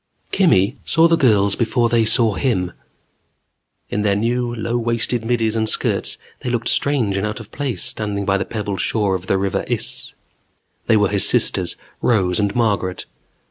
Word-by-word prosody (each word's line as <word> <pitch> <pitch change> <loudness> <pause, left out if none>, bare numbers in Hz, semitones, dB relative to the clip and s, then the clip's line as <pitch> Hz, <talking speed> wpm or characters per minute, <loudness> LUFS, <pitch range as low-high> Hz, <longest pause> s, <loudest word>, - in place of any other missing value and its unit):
_Kimmy 125 - +3
saw 165 0 +4
the 165 - +3
girls 105 -9 +3
before 120 +1 +1
they 115 -1 +2
saw 115 -1 +3
him. 95 -8 -1 1.2
In 105 - -1
their 100 -1 +2
new, 120 +3 0
low 115 +1 -3
waisted 115 0 -1
middies 115 -1 0
and 110 -1 0
skirts, - - -1 0.2
they 125 - -4
looked 120 -1 -1
strange 120 -9 +1
and 100 +2 -1
out 105 +2 -5
of 110 - -12
place 140 -4 -3
standing 105 -2 -2
by 100 0 +1
the - - 0
pebbled 100 -5 -4
shore 105 -3 0
of 95 0 -4
the 95 - +2
River 95 -1 -1
Iss. - - -1 0.7
They 110 - +4
were 105 -2 +2
his 100 -1 +2
sisters, - - +1 0.3
Rose 95 -6 +2
and 100 -1 0
Margaret. 100 -6 0
110 Hz, 175 wpm, -20 LUFS, 100-120 Hz, 1.2 s, saw